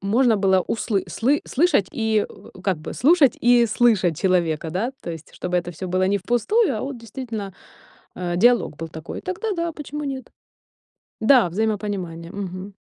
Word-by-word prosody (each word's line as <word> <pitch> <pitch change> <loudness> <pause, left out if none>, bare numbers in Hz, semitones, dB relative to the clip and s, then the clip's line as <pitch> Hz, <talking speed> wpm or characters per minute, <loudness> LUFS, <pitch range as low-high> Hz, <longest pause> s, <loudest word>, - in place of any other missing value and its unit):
можно 225 +3 +3
было 190 -1 +3
услы 210 0 -1
слы 275 +6 +1
слышать 280 - +2
и, 220 -2 +1
э, - - -14
как 190 -4 0
бы, 155 - -7
слушать 295 -1 +4
и 240 0 +5
слышать 210 -8 +2
человека, 170 -4 +1
да. 220 +10 -2
То 170 - -5
есть 160 -1 -9
чтобы 180 0 -2
это 175 0 -2
всё 185 +3 -6
было 185 +1 +1
не 200 +1 +1
впустую, 245 - +1
а - - -3
вот 270 -1 -4
действительно, 225 -3 -6 0.6
э, 175 -1 -3
диалог 235 -6 +3
был 165 +1 -6
такой. 160 0 -7
Тогда 370 +5 -4
да, 335 0 -1
почему 295 0 -6
нет? 265 -3 -5 0.9
Да, 230 -4 +5
взаимопонимание, 190 -4 -3
мгм. 195 0 -6
210 Hz, 170 wpm, -22 LUFS, 180-245 Hz, 0.9 s, и